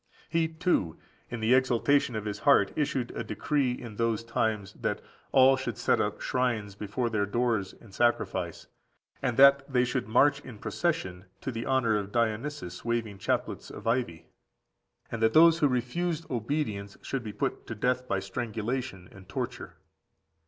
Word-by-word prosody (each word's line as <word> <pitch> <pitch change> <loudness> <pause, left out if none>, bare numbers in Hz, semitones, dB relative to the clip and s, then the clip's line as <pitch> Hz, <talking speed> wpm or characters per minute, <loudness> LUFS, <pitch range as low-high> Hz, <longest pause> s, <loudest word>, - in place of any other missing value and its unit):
He, 165 0 +2
too, 160 - 0 0.3
in 120 - -5
the 110 +3 +3
exaltation 130 +1 +3
of 110 -1 -3
his 105 -1 -4
heart, 140 +4 +4
issued 135 -5 -1
a - - -4
decree 140 -4 0
in 120 -4 -8
those 115 -1 0
times, 110 -4 -1
that - - -1 0.3
"all 135 0 +6
should 130 - -4
set - - +2
up - - -2
shrines 120 -6 -1
before 105 +5 -2
their 105 -3 0
doors, 115 -3 0
and 110 -5 -16
sacrifice, 120 +2 0 0.6
and 125 -3 -1
that 140 +1 +6
they 125 -1 +3
should 125 -1 -2
march 140 +6 +4
in 130 -6 -11
procession 105 - -2 0.2
to 130 - -3
the 115 -1 -5
honour 125 -5 +2
of 100 0 -6
Dionysus, 115 -3 -2
waving 115 -4 -2
chaplets - - -2
of - - -10
ivy;" 115 -8 -1 0.9
and 115 - -4
that 110 - +3
those 165 +1 +7
who 150 - +4
refused 155 +7 -1
obedience 110 -5 -2
should 135 -3 -3
be 110 - -5
put 105 - -3
to 115 - -5
death 125 +3 0
by 100 - 0
strangulation 110 +1 -4
and 95 -2 -15
torture. - - -5
120 Hz, 165 wpm, -29 LUFS, 105-135 Hz, 0.9 s, those